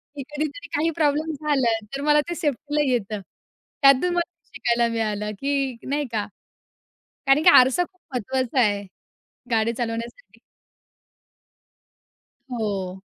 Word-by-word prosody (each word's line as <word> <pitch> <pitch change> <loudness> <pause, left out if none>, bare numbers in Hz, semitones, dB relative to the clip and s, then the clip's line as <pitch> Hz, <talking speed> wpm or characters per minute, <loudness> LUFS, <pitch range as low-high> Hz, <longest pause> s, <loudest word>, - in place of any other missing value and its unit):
की 275 - -5
कधीतरी 300 +5 -4
काही 310 +3 +2
प्रॉब्लेम 310 0 +1
झाला, 275 -5 +1 0.2
तर 275 - -4
मला 295 0 +4
ते 345 - -2
सेफ्टीला 295 -1 -1
येतं. 215 -3 -1 0.6
त्यातून 275 +6 +5
मला 345 -1 0 0.2
शिकायला 235 0 +1
मिळालं 210 -2 -1
की 275 -3 -1
नाही 290 +1 0
का, 210 -2 -1 1.0
कारण 275 +3 +5
की 355 - +6
आरसा 260 +4 +6
खूप 365 +1 -22
महत्त्वाचा 255 +1 0
आहे, 205 -3 +1 0.7
गाडी 225 0 +2
चालवण्यासाठी. 235 - -5 2.1
हो. 195 -5 -3
265 Hz, 120 wpm, -24 LUFS, 230-295 Hz, 2.1 s, की